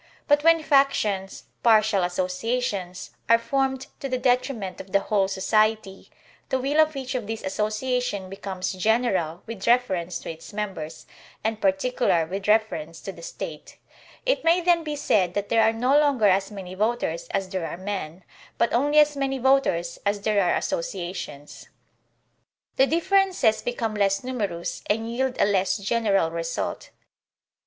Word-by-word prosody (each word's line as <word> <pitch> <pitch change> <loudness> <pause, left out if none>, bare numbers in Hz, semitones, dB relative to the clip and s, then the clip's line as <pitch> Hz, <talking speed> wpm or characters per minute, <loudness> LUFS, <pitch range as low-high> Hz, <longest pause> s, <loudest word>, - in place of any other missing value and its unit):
But 290 -1 +4
when 330 -1 +5
factions, 220 -10 +1 0.2
partial 215 -3 +4
associations, 185 +1 -2 0.2
are 230 - +7
formed 265 +2 -1
to 275 - -4
the 255 - 0
detriment 245 -6 0
of 190 - -15
the 200 - +5
whole 195 -1 +1
society, 215 +1 0 0.4
the 265 - +1
will 280 +4 0
of 310 -1 +4
each 265 -1 -4
of 245 -5 -3
these 225 0 -5
associations 215 +1 -1
becomes 190 -1 -4
general 190 -4 0
with 220 -4 -7
reference 190 -8 +2
to - - -5
its 165 +5 -12
members, 190 -7 -5 0.4
and 220 0 -2
particular 190 -3 +1
with 195 +4 -5
reference 190 -7 +1
to - - -6
the - - -13
State; - - -8 0.5
it - - +1
may 335 +2 +4
then 345 -1 +2
be 300 -1 -3
said 185 -10 +1
that 205 0 -2
there 225 - +4
are 220 0 +4
no 250 +5 +1
longer 280 -7 +2
as 195 0 +2
many 190 -3 -8
voters 205 -5 -1
as 195 -1 -1
there 185 -3 -3
are 165 - -6
men, 185 -3 -5 0.3
but 235 - +1
only 290 +5 +2
as 300 -1 +5
many 270 -1 -1
voters 250 -11 +1
as 205 0 0
there 205 -1 +2
are 175 - +2
associations. 165 -5 -5 1.1
The 265 - +4
differences 360 - +2
become 240 -3 -2
less 195 0 +1
numerous 205 -9 -3
and 215 +2 +2
3rield 250 +3 -2
a - - +5
less 195 -2 +1
general 200 -5 +1
result. 165 0 -4
215 Hz, 155 wpm, -25 LUFS, 190-255 Hz, 1.1 s, are